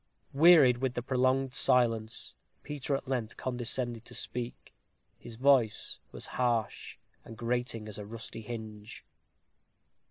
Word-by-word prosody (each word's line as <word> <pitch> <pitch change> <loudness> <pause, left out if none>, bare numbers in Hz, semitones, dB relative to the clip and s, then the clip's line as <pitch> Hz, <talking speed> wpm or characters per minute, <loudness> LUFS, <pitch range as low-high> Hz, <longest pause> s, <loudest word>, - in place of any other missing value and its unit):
Wearied 145 -5 +7
with 130 -1 -1
the 120 - -3
prolonged 130 0 +1
silence, 115 -3 +3 0.3
Peter 145 -1 -2
at 135 - -5
length 120 -4 -3
condescended 120 -2 -2
to - - -9
speak. 120 0 -4 0.5
His 115 - -9
voice 125 -3 +2
was - - -7 0.2
harsh 115 -4 -1 0.3
and 115 - -11
grating 120 -2 -2
as 105 0 -7
a 105 - -6
rusty 115 0 -8
hinge. 110 -1 -8
120 Hz, 125 wpm, -30 LUFS, 115-130 Hz, 0.5 s, Wearied